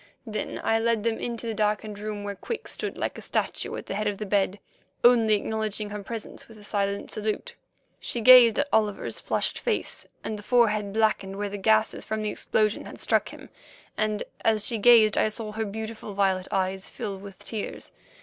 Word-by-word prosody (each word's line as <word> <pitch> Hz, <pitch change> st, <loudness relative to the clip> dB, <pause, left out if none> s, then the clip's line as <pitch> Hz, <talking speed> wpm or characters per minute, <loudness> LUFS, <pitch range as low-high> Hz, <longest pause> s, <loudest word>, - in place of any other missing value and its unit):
Then 215 Hz, -2 st, -4 dB
I 225 Hz, 0 st, +2 dB
led 230 Hz, -2 st, +1 dB
them 230 Hz, -1 st, 0 dB
into 235 Hz, -1 st, -4 dB
the 225 Hz, -, -2 dB
darkened 210 Hz, -1 st, -1 dB
room 210 Hz, -1 st, -5 dB
where 205 Hz, 0 st, -3 dB
Quick 445 Hz, -, -6 dB
stood -, -, -3 dB
like -, -, -3 dB
a -, -, -9 dB
statue -, -, -1 dB
at -, -, -6 dB
the -, -, -5 dB
head 210 Hz, +2 st, -1 dB
of 205 Hz, -1 st, -1 dB
the 215 Hz, -, -4 dB
bed, 200 Hz, 0 st, +1 dB, 0.4 s
only 230 Hz, -3 st, +6 dB
acknowledging 215 Hz, 0 st, -2 dB
her 210 Hz, 0 st, -5 dB
presence 225 Hz, +1 st, -7 dB
with 225 Hz, -, -14 dB
a 210 Hz, -, -14 dB
silent 200 Hz, -1 st, -2 dB
salute. 215 Hz, -, -3 dB, 0.5 s
She 240 Hz, -, -3 dB
gazed 240 Hz, -1 st, +8 dB
at 285 Hz, -, +2 dB
Oliver's 210 Hz, -2 st, +1 dB
flushed -, -, -1 dB
face 460 Hz, -3 st, -2 dB, 0.2 s
and 215 Hz, -1 st, -4 dB
the -, -, -8 dB
forehead 215 Hz, -3 st, +2 dB
blackened 215 Hz, -3 st, +1 dB
where 205 Hz, 0 st, -2 dB
the 205 Hz, -, -5 dB
gases 220 Hz, +2 st, +2 dB
from 220 Hz, 0 st, -3 dB
the 210 Hz, -, -1 dB
explosion 215 Hz, -1 st, 0 dB
had -, -, -9 dB
struck -, -, +1 dB
him, -, -, -12 dB, 0.5 s
and 215 Hz, -1 st, 0 dB, 0.2 s
as 215 Hz, -2 st, +3 dB
she 230 Hz, -3 st, +1 dB
gazed 220 Hz, -1 st, +6 dB
I -, -, +3 dB
saw 215 Hz, 0 st, -4 dB
her 220 Hz, +1 st, -2 dB
beautiful 220 Hz, 0 st, -6 dB
violet 190 Hz, -2 st, +1 dB
eyes 190 Hz, -1 st, -1 dB
fill 195 Hz, -2 st, -5 dB
with 195 Hz, -1 st, -11 dB
tears. 220 Hz, -3 st, -6 dB
215 Hz, 200 wpm, -26 LUFS, 205-225 Hz, 0.5 s, gazed